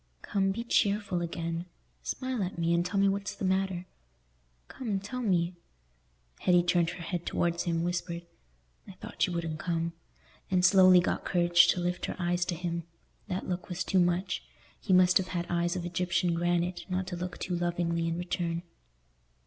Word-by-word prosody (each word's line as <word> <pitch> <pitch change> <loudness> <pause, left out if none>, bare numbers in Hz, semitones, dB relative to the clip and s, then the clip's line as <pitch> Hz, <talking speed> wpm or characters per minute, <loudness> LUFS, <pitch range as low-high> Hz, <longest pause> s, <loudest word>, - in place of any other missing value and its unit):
"Come, 195 -1 +1
be 230 +4 -3
cheerful 205 -5 +1
again. 170 0 -3 0.3
Smile 255 -3 -3
at 185 -1 -3
me, 170 0 +1
and 170 0 +3
tell 190 +3 -1
me 200 - +5
what's 200 0 -1
the - - -4
matter. 190 -1 0 0.8
Come, 215 -7 -3
tell 245 +6 -5
me." 180 -5 +1 0.9
Hetty 175 -1 +4
turned 175 -1 +2
her 175 0 -7
head 175 0 -3
towards 170 -1 0
him, 165 -1 0
whispered, 175 -1 -3 0.6
"I - - -9
thought - - -2
you 180 - -4
wouldn't 165 -2 -3
come," 170 0 -1 0.6
and 180 -1 +3
slowly 185 -1 +7
got - - -1
courage 175 -1 +5
to 180 - +2
lift 180 0 -1
her - - -4
eyes 175 0 0
to 175 - -2
him. 170 0 -3 0.5
That 185 -2 -3
look 180 -1 -3
was 180 0 -2
too 185 - +2
much: 175 +1 +1 0.4
he 195 - -3
must 185 0 +6
have 185 - -3
had 175 -2 -2
eyes 175 +1 +1
of 175 -1 -3
Egyptian 175 0 0
granite 175 0 0
not 185 +1 -1
to 185 -1 -5
look 180 +1 -5
too 180 - -3
lovingly 170 -1 0
in 165 0 -1
return. 175 -1 -2
175 Hz, 180 wpm, -30 LUFS, 170-185 Hz, 0.9 s, slowly